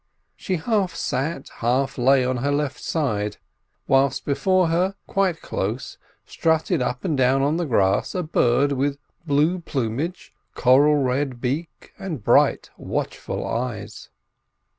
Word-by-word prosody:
She 185 - -3
half 190 -1 0
sat, 135 0 -2
half 125 +4 0
lay 130 +1 +3
on 130 0 0
her 140 +4 -1
left 145 -1 -1
side; 105 -10 -1 0.5
whilst 135 -1 +2
before 185 +4 +2
her, 180 +4 +1
quite 190 -4 0
close, 110 +6 -4 0.3
strutted 160 0 0
up 125 +3 -2
and 160 -5 0
down 130 +1 +3
on 150 +3 +1
the 175 - -1
grass, 100 - +1
a 180 - -1
bird, 140 -2 +2
with 140 +1 0 0.3
blue 155 +5 +2
plumage, 145 - -3 0.2
coral 140 +4 +5
red 130 -2 0
beak, 140 +7 -4
and 170 - -5
bright, - - +3
watchful - - -4
eyes. 115 -3 -4
140 Hz, 135 wpm, -23 LUFS, 125-165 Hz, 0.5 s, coral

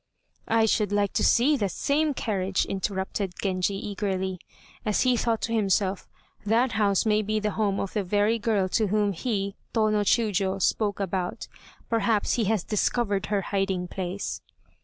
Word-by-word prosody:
"I 225 0 +3
should 210 -2 +1
like 205 -1 +1
to - - +1
see 275 +6 +4
that 200 -5 0
same 290 - 0
carriage," 195 -5 -1
interrupted 190 -1 -3
Genji 190 0 0
eagerly, 190 -2 -3 0.4
as 210 -2 +1
he 255 -1 +3
thought 230 -1 0
to 230 - -1
himself, 195 -3 +1 0.4
"that 230 +4 +2
house 200 -2 +2
may 215 -1 +3
be 215 +1 -1
the 210 0 -1
home 200 -2 0
of 195 - -3
the 210 - 0
very 205 +4 +1
girl 210 -4 +1
whom 205 +1 +1
he 200 0 -2 0.2
(Tô 215 -1 +3
no 210 -1 +2
Chiûjiô) 200 -3 +1
spoke 205 +2 +1
about, 185 -2 -3 0.4
perhaps 225 -2 +1
he 230 - +1
has 210 -2 +1
discovered 210 -2 0
her 205 -1 0
hiding 195 -2 -1
place." 185 +2 -4
205 Hz, 160 wpm, -26 LUFS, 195-220 Hz, 0.4 s, see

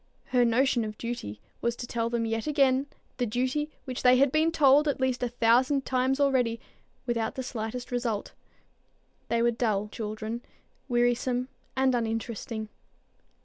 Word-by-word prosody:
Her 250 -1 +4
notion 240 +1 +3
of 215 -1 -6
duty 230 - -5 0.2
was 235 0 0
to 240 - -6
tell 230 -1 -2
them 235 -1 -1
yet 225 +3 -2
again 275 -2 +3 0.3
the 245 - 0
duty 260 +7 -1 0.2
which 255 -3 -4
they 250 0 +6
had 275 0 +4
been 315 +2 +3
told 295 -1 +5
at 285 - 0
least 260 -1 0
a 245 - 0
thousand 245 +4 +3
times 260 +1 +1
already, 250 -5 +2 0.5
without 230 -2 -1
the 260 - -3
slightest 245 0 -5
result. 235 -4 -2 1.0
They 235 0 +1
were 240 - +4
dull 215 -3 0
children, 215 +1 -5 0.5
wearisome 245 +1 +1 0.3
and 260 0 +3
uninteresting. 225 -1 -3
245 Hz, 150 wpm, -28 LUFS, 230-260 Hz, 1.0 s, they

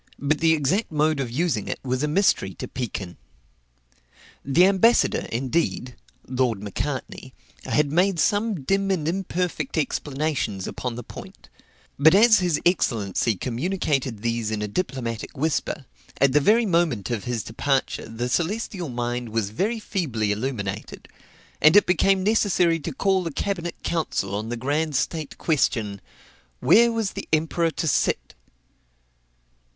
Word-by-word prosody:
but 145 +2 0
the 165 -1 +4
exact 160 - 0
mode 155 -1 +1
of 130 -3 -2
using 130 - -1
it - - -3
was 130 0 -1
a 150 - +1
mystery 150 - +1
to - - -6
Pekin. 100 -8 -5 1.3
The 150 +7 +4
ambassador, 200 +5 +3
indeed, 125 0 -1 0.3
(Lord 125 -4 0
Macartney,) 100 -2 -5 0.3
had 150 -2 +1
made 180 +2 +2
some 205 +2 +1
dim 195 +6 +1
and 170 -6 0
imperfect 175 -4 -2
explanations 145 -8 -2
upon 125 -2 -4
the 120 - -6
point; - - -12 0.5
but 160 +5 +6
as 220 +1 +6
his 175 -4 +1
excellency 115 - +1
communicated 130 - -2
these 115 -2 -1
in 110 -1 -2
a - - -2
diplomatic 120 - -4
whisper, 150 -1 -1 0.3
at 140 -1 +4
the 150 - +6
very 220 +10 +4
moment 165 - +1
of 110 -5 -3
his 120 -4 -2
departure, 135 +1 -1
the 115 +2 -3
celestial 180 - -2
mind 120 0 -3
was 110 -2 -2
very 205 - -1
feebly 130 - -2
illuminated; 105 -3 -4 0.5
and 155 +4 +6
it 205 - +7
became 190 +2 +2
necessary 185 -5 +2
to - - -5
call 190 -7 +1
a - - -3
cabinet 175 +1 -3
council 155 - -2
on 105 +2 -3
the 120 - -3
grand 145 +5 -1
state 155 +2 -2
question 115 - 0 0.6
"Where 235 - +5
was 225 -4 -1
the - - -7
emperor 160 +2 +1
to 160 +1 -3
sit?" - - 0
150 Hz, 145 wpm, -24 LUFS, 120-180 Hz, 1.3 s, it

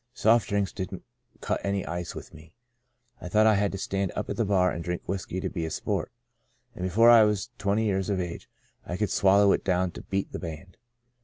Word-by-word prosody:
Soft 115 -2 +3
drinks 100 -1 0
didn't 95 -3 -6 0.4
cut - - -2
any 100 -1 -1
ice 85 0 -5
with - - -9
me. 80 0 -15 0.7
I 90 - -6
thought 110 +3 +4
I 110 - +6
had 100 -1 +1
to - - -3
stand 95 0 -2
up 105 - -3
at - - -2
the 115 - 0
bar 95 -2 +2
and 85 - -5
drink 90 0 -4
whiskey 95 -1 -4
to 95 - -2
be 85 -2 -4
a 80 - -2
sport, - - -3 0.6
and - - -7
before 115 +6 +5
I 115 -1 +8
was 105 -2 +1
twenty 100 +3 +1
years 95 -1 0
of 100 -2 0
age 85 -2 -5 0.3
I 90 - -5
could 105 -1 -1
swallow 100 +1 +5
it - - +1
down 90 -1 +1
to - - -9
beat 100 0 -3
the - - -5
band. 85 +2 -8
95 Hz, 225 wpm, -27 LUFS, 90-100 Hz, 0.7 s, I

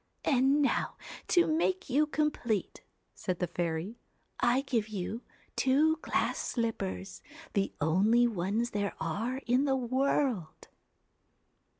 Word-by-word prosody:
'And 275 +1 +4
now - - 0 0.3
to 350 -2 +4
make 345 +4 0
you 290 +4 +2
complete,' 295 -9 -1 0.3
said 185 -3 -3
the 180 - 0
fairy, 170 +5 -3 0.4
1 240 - +4
1 265 - +2
give 230 -5 0
you 215 +2 -4 0.3
two 305 +5 +3
glass - - -1
slippers, 200 -5 -3 0.3
the 195 -2 +1
only 200 +10 +4
ones 220 +2 -1
there 205 -3 -2
are 220 +11 -2
in 250 +4 +3
the 270 -2 +2
world.' 255 - 0
235 Hz, 120 wpm, -31 LUFS, 195-270 Hz, 0.4 s, And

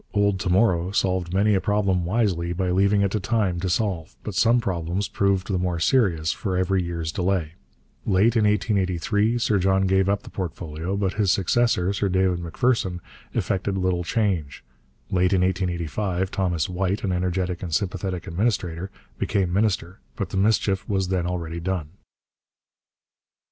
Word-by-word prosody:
'Old 100 -2 +2
To 90 - -2
Morrow' 90 -2 +3
solved 95 -3 0
many 100 +3 +3
a 95 - +2
problem 100 -4 +1
wisely 90 -4 0
by 90 0 -1
leaving 100 +2 +3
it 100 - +1
to 110 - 0
time 100 -3 0
to 95 +1 -2
solve, 90 -4 -1
but 105 - -5
some 120 +5 +4
problems 90 -2 -2
proved 100 -2 +1
the 95 -3 0
more 90 -2 -1
serious 85 - +2
for 95 -3 -2
every 95 +1 +1
year's 85 -2 -3
delay. 90 -3 -1 0.5
Late 105 +4 +3
in 110 -2 +3
1883 105 +1 +1
Sir 110 -4 +1
John 95 +1 +2
gave 95 0 +2
up 100 0 0
the - - -12
portfolio, 85 0 -4
but 95 -2 0
his 100 -3 +3
successor, 100 -1 +2
Sir 100 0 0
David 95 -1 +1
Macpherson, 90 +1 0 0.4
effected 95 0 -1
little 90 -2 0
change. 85 - -1 0.5
Late 90 0 +2
in 95 - +3
1885 90 +1 -1
Thomas 90 -5 0
White, 95 +4 -1
an 100 - 0
energetic 90 0 -1
and 90 - -5
sympathetic 90 0 -2
administrator, 90 -2 -1 0.3
became 95 -3 0
minister, 95 -3 0 0.2
but - - -3
the - - -6
mischief 95 -1 +1
was 95 -2 0
then 90 -2 0
already 85 -2 -3
done. 85 -3 -3
95 Hz, 160 wpm, -24 LUFS, 90-100 Hz, 0.5 s, some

